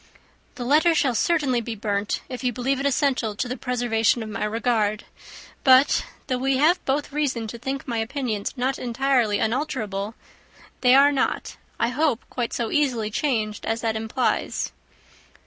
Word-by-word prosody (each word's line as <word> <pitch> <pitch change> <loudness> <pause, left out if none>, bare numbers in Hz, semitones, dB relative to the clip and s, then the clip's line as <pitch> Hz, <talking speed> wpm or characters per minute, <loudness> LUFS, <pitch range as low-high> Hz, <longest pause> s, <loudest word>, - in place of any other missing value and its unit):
"The 245 - -5
letter 315 +5 +4
shall 270 -5 +2
certainly 270 -1 +1
be 230 0 -5
burnt, 205 -1 -2
if 255 0 -7
you 250 - +1
believe 255 +2 -1
it 280 - +1
essential 260 -6 +1
to 245 - -2
the 250 - -3
preservation 240 -3 +1
of 215 - -7
my 210 - -2
regard; 215 -1 0 0.6
but, 260 0 +5 0.2
though 255 -1 -1
we 265 +1 +1
have 320 +6 +3
both 285 +2 -1
reason 275 -6 -1
to 235 - -7
think 270 +3 -4
my 235 -2 -1
opinions 225 -3 -3
not 260 +2 -1
entirely 245 -3 +1
unalterable, 220 -5 -2 0.7
they 250 0 +6
are 280 +1 +6
not, 275 - -1 0.2
I 230 - +2
hope, 265 -1 0
quite 240 -2 -2
so 235 -2 -2
easily 245 -8 +1
changed 215 -5 -1
as 225 +1 -1
that 225 -1 -1
implies." 220 +3 -1
250 Hz, 165 wpm, -24 LUFS, 225-275 Hz, 0.7 s, they